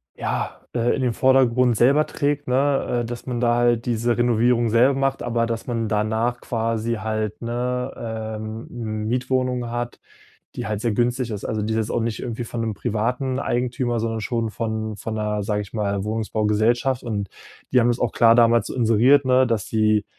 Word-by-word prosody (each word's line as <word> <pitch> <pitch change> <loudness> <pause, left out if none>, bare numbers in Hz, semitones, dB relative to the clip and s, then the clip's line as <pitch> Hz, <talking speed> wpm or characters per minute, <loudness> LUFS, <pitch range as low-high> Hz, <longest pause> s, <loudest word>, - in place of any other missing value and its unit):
ja, - - -3
äh, 120 0 +1
in 135 - -3
den 125 -2 +1
Vordergrund 125 -1 +3
selber 140 +7 +4
trägt, 145 0 -2
ne, 135 -1 +1
äh, - - -4
dass 120 0 -7
man 125 -2 -3
da 120 0 +3
halt 120 -1 +2
diese 120 0 0
Renovierung 120 0 +2
selber 120 +5 +4
macht, 135 0 0
aber 120 -1 0
dass 115 +1 -4
man 115 -3 -2
danach 110 +3 0
quasi 115 0 -1
halt, 110 0 -3
'ne, 125 +2 -2 0.5
ähm, 110 0 -5
Mietwohnung 125 0 -1
hat, 120 0 -4 0.6
die - - -4
halt 105 -1 -2
sehr 120 -2 0
günstig 120 +1 0
ist. 105 - -5
Also, 110 -1 -2
die 110 +1 -1
ist - - 0
jetzt 110 0 -1
auch - - 0
nicht 115 -1 -2
irgendwie 120 -1 -4
von 115 0 -4
'nem 110 -2 -2
privaten 125 +5 -1
Eigentümer, 120 -1 -1
sondern 115 -1 -2
schon 115 -2 -2
von 110 -1 -3
von 110 +1 -5
'ner, 105 -1 -1
sage 105 0 -1
ich 100 - -15
mal, 100 -2 -1
Wohnungsbaugesellschaft 110 +3 0
und 105 -4 -3 0.5
die 125 - +6
haben 120 - +3
es 120 - 0
auch 120 - 0
klar 115 -1 +5
damals 115 0 +4
inseriert 125 +4 +4
ne, 130 0 +4
dass 115 -4 -1
die 110 -1 +2
115 Hz, 185 wpm, -22 LUFS, 110-125 Hz, 0.6 s, die